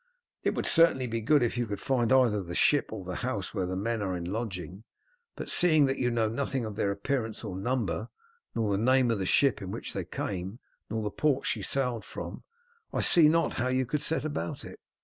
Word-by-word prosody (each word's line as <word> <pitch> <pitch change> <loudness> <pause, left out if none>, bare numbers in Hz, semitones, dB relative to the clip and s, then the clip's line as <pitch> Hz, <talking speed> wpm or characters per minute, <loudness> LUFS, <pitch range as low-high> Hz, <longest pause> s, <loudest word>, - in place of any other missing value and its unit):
"It - - 0
would - - -2
certainly 165 -6 +4
be 115 -1 -3
good 145 +4 +4
if 120 +1 -1
you 120 - -1
could 100 -1 -4
find 125 -4 0
either 125 -6 +4
the 85 -1 -7
ship - - +3
or - - -6
the - - -4
house - - -3
where 95 -2 -1
the 95 - -3
men 110 +3 -2
are 95 -3 -2
in 85 - -5
lodging, 95 -2 -5 0.5
but - - -6
seeing 155 -5 +5
that 135 0 -1
you 125 - +1
know 115 -2 +1
nothing 130 +2 -2
of 110 -2 -6
their 100 - 0
appearance 110 +3 -2
or 90 - -5
number, 120 +2 -2 0.5
nor 110 -3 0
the 100 - +1
name 130 +1 +3
of 110 - -1
the 95 - -2
ship 135 -7 +3
in 95 - -6
which - - -5
they - - -3
came 95 +3 -4 0.3
nor 110 -1 -2
the 105 - -2
port 135 +6 0
she - - -1
sailed 125 -5 -1
from, - - -7 0.5
I - - -1
see 160 -3 +6
not 165 +1 +2
how 125 - +1
you 130 0 +1
could 145 +4 -2
set 155 +1 +1
about 140 - -4
it." - - -10
115 Hz, 225 wpm, -29 LUFS, 100-130 Hz, 0.5 s, see